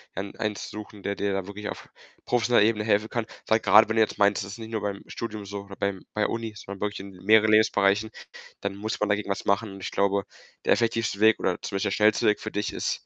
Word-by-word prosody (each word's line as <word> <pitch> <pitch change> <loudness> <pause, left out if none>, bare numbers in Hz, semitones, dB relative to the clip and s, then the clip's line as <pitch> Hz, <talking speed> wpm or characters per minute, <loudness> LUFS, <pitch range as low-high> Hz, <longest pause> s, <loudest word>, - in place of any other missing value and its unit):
ein 100 +1 -5
eins 105 -1 -3
suchen, 105 -1 -9
der 100 0 -2
dir 100 0 -1
da 95 -1 -2
wirklich 105 +1 -6
auf - - -8 0.4
professioneller 120 -2 +3
Ebene 110 -1 +1
helfen 110 0 +2
kann. 120 -2 -2 0.2
Weil 110 - +4
grade, 100 +1 +6
wenn 110 - 0
du 110 - +4
jetzt 110 - +1
meinst, 100 -1 +3
das 100 +1 -7
ist - - -8
nicht 110 0 -8
nur 110 - -2
beim 100 -1 -3
Studium 110 -3 -6
so 100 0 -6
oder 100 -1 -11
beim 100 -2 -3
bei 105 - +1
Uni, 115 -1 -4
sondern 100 -1 -9
wirklich 105 -1 -2
in 100 0 -9
mehreren 110 +1 +5
Lebensbereichen, 105 0 +3 0.5
dann 100 0 -3
muss 110 +3 -4
man 105 - 0
dagegen 105 0 0
was 100 - -2
machen. 100 +2 +1
Und 95 - -10
ich - - -4
glaube, 100 0 +1 0.4
der - - +5
effektivste 115 -3 0
Weg 110 0 +5
oder 95 - +1
zum - - -5
Beispiel 100 +2 0
der - - -5
schnellste 105 0 +3
Weg 105 - +3
für - - -6
dich 105 0 -2
ist, - - -3
105 Hz, 255 wpm, -26 LUFS, 100-110 Hz, 0.5 s, grade